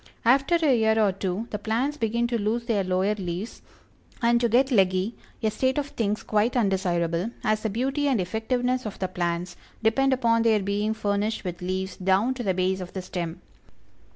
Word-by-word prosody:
After 270 Hz, +7 st, +4 dB
a 310 Hz, -6 st, +3 dB
year 220 Hz, -1 st, +3 dB
or 210 Hz, -3 st, +4 dB
two 190 Hz, +3 st, -3 dB
the 210 Hz, -, -3 dB
plants 245 Hz, +7 st, -1 dB
begin 235 Hz, -3 st, 0 dB
to 235 Hz, -1 st, 0 dB
lose 225 Hz, +3 st, -1 dB
their 215 Hz, -5 st, +1 dB
lower 185 Hz, +2 st, +1 dB
leaves, 190 Hz, +1 st, -5 dB, 0.6 s
and 235 Hz, -1 st, +3 dB
to 235 Hz, -, +2 dB
get 260 Hz, +4 st, +3 dB
leggy, 190 Hz, 0 st, +2 dB, 0.3 s
a 215 Hz, -, +2 dB
state 260 Hz, +4 st, 0 dB
of 290 Hz, -1 st, -1 dB
things 215 Hz, -4 st, -2 dB
quite 215 Hz, +4 st, +1 dB
undesirable, 180 Hz, -3 st, 0 dB
as 215 Hz, 0 st, +1 dB
the 220 Hz, -, -1 dB
beauty 270 Hz, +7 st, 0 dB
and 260 Hz, -6 st, +2 dB
effectiveness 245 Hz, +6 st, -1 dB
of 210 Hz, -, -7 dB
the 185 Hz, -, -2 dB
plants 175 Hz, -1 st, -2 dB, 0.3 s
depend 270 Hz, +5 st, +3 dB
upon 230 Hz, -3 st, +2 dB
their 225 Hz, -2 st, +4 dB
being 205 Hz, +3 st, -1 dB
furnished 210 Hz, +1 st, -1 dB
with 180 Hz, -1 st, -5 dB
leaves 185 Hz, +1 st, -3 dB
down 195 Hz, +6 st, +2 dB
to 255 Hz, -, -6 dB
the 190 Hz, -5 st, 0 dB
base 185 Hz, +1 st, 0 dB
of 180 Hz, -, -8 dB
the 190 Hz, -, -4 dB
stem. 175 Hz, -2 st, -5 dB
215 Hz, 190 wpm, -25 LUFS, 190-240 Hz, 0.6 s, After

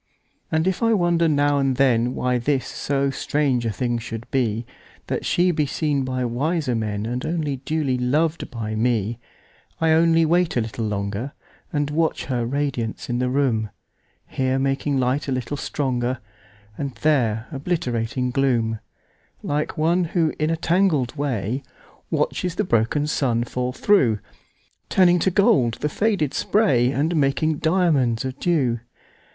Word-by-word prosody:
And 160 Hz, +1 st, +1 dB
if 190 Hz, -1 st, 0 dB
I 230 Hz, -1 st, +3 dB
wonder 170 Hz, -3 st, +2 dB
now 145 Hz, -1 st, +2 dB
and 135 Hz, -2 st, +1 dB
thenWhy 125 Hz, -1 st, +1 dB
this 135 Hz, -2 st, +1 dB
so 140 Hz, -1 st, -1 dB
strange 135 Hz, -4 st, 0 dB
a -, -, 0 dB
thing 120 Hz, +1 st, -1 dB
should 115 Hz, 0 st, -6 dB
be—That 120 Hz, -2 st, -3 dB
she 180 Hz, +1 st, +3 dB
be 155 Hz, -3 st, 0 dB
seen 145 Hz, -1 st, 0 dB
by 130 Hz, -1 st, -2 dB
wiser 140 Hz, +3 st, -1 dB
menAnd 110 Hz, +2 st, -2 dB
only 155 Hz, -5 st, -2 dB
duly 135 Hz, -1 st, -1 dB
lov'd 155 Hz, +6 st, 0 dB
by 110 Hz, -2 st, -4 dB
me:I 120 Hz, +7 st, -2 dB
only 165 Hz, 0 st, +4 dB
wait 170 Hz, -2 st, +2 dB
a -, -, +3 dB
little 110 Hz, 0 st, -3 dB
longer, 100 Hz, +5 st, -3 dB, 0.4 s
And 145 Hz, -1 st, -1 dB
watch 160 Hz, +1 st, 0 dB
her 120 Hz, -3 st, -1 dB
radiance 125 Hz, -4 st, -2 dB
in 120 Hz, -, 0 dB
the 125 Hz, 0 st, 0 dB
room; 125 Hz, -5 st, +1 dB, 0.6 s
Here 130 Hz, 0 st, -1 dB
making 135 Hz, +1 st, 0 dB
light 130 Hz, +4 st, 0 dB
a -, -, -2 dB
little 130 Hz, +2 st, -2 dB
stronger, 130 Hz, -3 st, -1 dB, 0.6 s
And 140 Hz, -3 st, -3 dB
there 120 Hz, -8 st, +2 dB
obliterating 130 Hz, -5 st, -2 dB
gloom,(Like 125 Hz, +3 st, -3 dB
one 170 Hz, +3 st, +2 dB
who, 165 Hz, -1 st, 0 dB
in 155 Hz, +1 st, +1 dB
a 165 Hz, -, 0 dB
tangled 165 Hz, -7 st, +1 dB
way, 130 Hz, -3 st, -2 dB, 0.5 s
Watches 180 Hz, -2 st, -1 dB
the 210 Hz, -, +1 dB
broken 120 Hz, -, +1 dB
sun 125 Hz, -6 st, 0 dB
fall 125 Hz, +1 st, -3 dB
through, 130 Hz, -, +3 dB, 0.7 s
Turning 180 Hz, -2 st, +4 dB
to 190 Hz, -, +2 dB
gold 135 Hz, -, +3 dB
the 150 Hz, -, 0 dB
faded 195 Hz, -5 st, 0 dB
spray, 135 Hz, -, +2 dB
And 155 Hz, +5 st, 0 dB
making 150 Hz, +1 st, +1 dB
diamonds 155 Hz, -9 st, +2 dB
of 130 Hz, 0 st, -5 dB
dew). 135 Hz, -9 st, +1 dB
135 Hz, 145 wpm, -23 LUFS, 120-160 Hz, 0.7 s, only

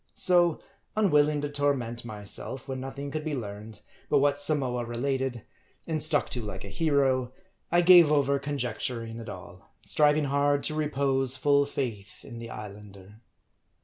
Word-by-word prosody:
So, 175 Hz, -3 st, +4 dB, 0.4 s
unwilling 150 Hz, -8 st, +3 dB
to 145 Hz, -, -3 dB
torment 140 Hz, -5 st, -1 dB
myself 110 Hz, +4 st, -7 dB
when 130 Hz, -1 st, -4 dB
nothing 140 Hz, +2 st, -6 dB
could 155 Hz, +1 st, -4 dB
be 155 Hz, -2 st, -2 dB
learned, 105 Hz, -2 st, -8 dB, 0.3 s
but 145 Hz, -, +4 dB
what 145 Hz, 0 st, +2 dB
Samoa 135 Hz, -5 st, +1 dB
related, 125 Hz, 0 st, -2 dB, 0.4 s
and 155 Hz, -2 st, -2 dB
stuck 150 Hz, -2 st, +2 dB
to 125 Hz, -, -3 dB
like 105 Hz, -3 st, -6 dB
a 100 Hz, -, -8 dB
hero; 130 Hz, 0 st, +1 dB, 0.4 s
I 175 Hz, +1 st, +4 dB
gave 175 Hz, -3 st, +8 dB
over 140 Hz, -1 st, +2 dB
conjecturing 125 Hz, -4 st, -4 dB
at 115 Hz, -1 st, -8 dB
all; 95 Hz, 0 st, -12 dB
striving 150 Hz, 0 st, +3 dB
hard 140 Hz, 0 st, +1 dB
to 155 Hz, -, -1 dB
repose 140 Hz, -3 st, +1 dB
full 140 Hz, +1 st, +3 dB
faith 115 Hz, -8 st, -5 dB
in 120 Hz, -4 st, -9 dB
the 115 Hz, 0 st, -8 dB
Islander. 105 Hz, 0 st, -11 dB
135 Hz, 150 wpm, -27 LUFS, 115-145 Hz, 0.4 s, gave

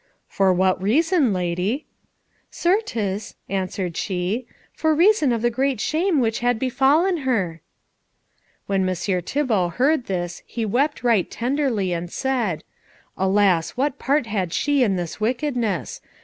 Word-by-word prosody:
"For 195 Hz, -1 st, +2 dB
what 185 Hz, 0 st, +2 dB
reason, 295 Hz, -, +2 dB
lady?" 180 Hz, -, -1 dB, 0.6 s
"Certes," 230 Hz, -, -1 dB
answered 185 Hz, -2 st, -2 dB
she, 190 Hz, +8 st, -2 dB, 0.3 s
"for 315 Hz, -1 st, +1 dB
reason 340 Hz, -, +4 dB
of 230 Hz, -1 st, -1 dB
the 240 Hz, -, +2 dB
great 260 Hz, 0 st, 0 dB
shame 325 Hz, -, +1 dB
which 225 Hz, -3 st, 0 dB
had 245 Hz, -1 st, +1 dB
befallen 280 Hz, +9 st, +2 dB
her." 200 Hz, -, -1 dB, 1.0 s
When 195 Hz, -1 st, 0 dB
Messire 185 Hz, 0 st, -1 dB
Thibault 210 Hz, -, 0 dB
heard 270 Hz, 0 st, +2 dB
this 175 Hz, -2 st, -3 dB
he 230 Hz, -2 st, -3 dB
wept 265 Hz, +7 st, 0 dB
right 230 Hz, -7 st, +2 dB
tenderly, 240 Hz, -6 st, -1 dB
and 170 Hz, 0 st, -4 dB
said, 240 Hz, -, -1 dB, 0.5 s
"Alas, 190 Hz, -2 st, +2 dB
what 275 Hz, +1 st, 0 dB
part 280 Hz, 0 st, +1 dB
had 195 Hz, -6 st, -2 dB
she 290 Hz, -2 st, +1 dB
in 210 Hz, -6 st, +3 dB
this 175 Hz, +2 st, -5 dB
wickedness! 240 Hz, -, -1 dB
225 Hz, 135 wpm, -22 LUFS, 185-275 Hz, 1.0 s, reason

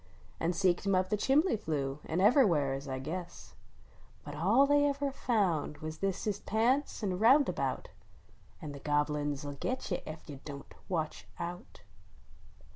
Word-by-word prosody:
An 165 Hz, -, +1 dB
seeked 185 Hz, +1 st, +1 dB
him 195 Hz, -, +3 dB
up 185 Hz, 0 st, +1 dB
the -, -, +4 dB
ehimbly 270 Hz, -, +2 dB
flue, 140 Hz, -4 st, -2 dB
an 165 Hz, -, -1 dB
ever 250 Hz, +8 st, +6 dB
wheres, 140 Hz, -5 st, 0 dB
I 130 Hz, -1 st, -3 dB
guess; 170 Hz, +6 st, -6 dB, 0.7 s
But 145 Hz, -, -8 dB
all 200 Hz, -, +4 dB
they 290 Hz, +1 st, +4 dB
ever 280 Hz, 0 st, -1 dB
found 190 Hz, -, 0 dB
was 155 Hz, +1 st, -7 dB
thist 195 Hz, -1 st, -1 dB
his 205 Hz, -2 st, -1 dB
pants 240 Hz, +6 st, 0 dB
an 185 Hz, -3 st, -1 dB
rounda 265 Hz, +7 st, +5 dB
bout: -, -, -2 dB, 0.7 s
An 150 Hz, -, -5 dB
the 140 Hz, -, -8 dB
Gobble 150 Hz, +1 st, +1 dB
uns 145 Hz, -1 st, -3 dB
ll 145 Hz, -, -4 dB
git 255 Hz, -4 st, -3 dB
you 180 Hz, -, 0 dB
Ef 155 Hz, +1 st, -8 dB
you 140 Hz, -2 st, -8 dB
Don 140 Hz, -2 st, -7 dB
t -, -, -19 dB
\Yatch 160 Hz, -4 st, -2 dB
Out! 175 Hz, +1 st, -7 dB
180 Hz, 175 wpm, -32 LUFS, 150-225 Hz, 0.7 s, ever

